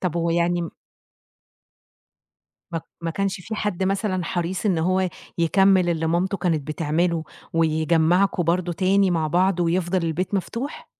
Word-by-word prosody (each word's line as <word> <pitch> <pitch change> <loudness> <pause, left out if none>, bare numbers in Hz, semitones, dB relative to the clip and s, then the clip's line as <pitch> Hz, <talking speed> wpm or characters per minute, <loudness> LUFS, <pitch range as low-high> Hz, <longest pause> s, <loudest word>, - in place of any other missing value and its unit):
طَب 175 -3 -1
هو 170 0 0
يعني 170 +1 +1
م 165 - -5 2.0
ما 165 - -1 0.2
ما 165 -1 -2
كانش 195 +2 -2
في 220 +5 -6
حد 210 -4 -2
مثلًا 190 -1 -1
حريص 175 +4 -2
إن 185 -5 +2
هو 185 +3 +1 0.3
يكمِّل 190 +2 +4
اللي 165 -1 0
مامته 180 +4 0
كانت 165 -7 -1
بتعمله 165 +2 0 0.3
ويجمَّعكم 165 +3 +2
برضه 175 +1 0
تاني 190 +2 +2
مع 165 -3 +1
بعض 180 +3 +2
ويفضل 175 +2 +1
البيت 175 +5 -2
مفتوح؟ 230 - -4
175 Hz, 140 wpm, -23 LUFS, 165-190 Hz, 2.0 s, يكمِّل